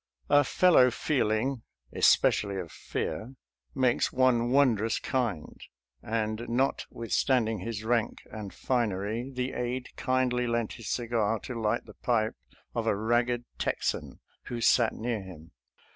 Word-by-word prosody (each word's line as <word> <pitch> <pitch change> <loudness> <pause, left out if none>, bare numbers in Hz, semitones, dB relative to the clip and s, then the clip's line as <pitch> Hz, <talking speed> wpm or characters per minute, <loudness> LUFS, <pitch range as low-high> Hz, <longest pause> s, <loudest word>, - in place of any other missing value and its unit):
"A 145 0 +7
fellow 145 -3 +5
feel 130 -2 0
ing 120 +4 0
" - - -61
— - - -26
especially 100 -2 +4
of 85 -4 -5
fear 125 +5 -4
— - - -65
" - - -35
makes 120 - +2
one 125 -2 +3
wondrous 120 -5 +3
kind," 115 -12 -2 0.4
and 110 +1 -2
notwithstanding 115 -2 0
his 110 +2 -5
rank 115 0 0
and 105 -2 -6
finery, 115 0 -1
the 125 -1 -3
aide 125 +1 -3
kindly 125 -1 +1
lent 115 -2 -1
his 115 -4 -8
cigar 115 -2 0
to 130 - -6
light 110 -3 -1
the 105 - -12
pipe 110 -2 0 0.4
of - - -2
a - - +3
ragged 120 +2 +1
Texan - - -2 0.3
who 120 - -4
sat 115 0 +4
near 115 -2 -2
him. 85 -4 -12
115 Hz, 145 wpm, -29 LUFS, 110-125 Hz, 0.4 s, A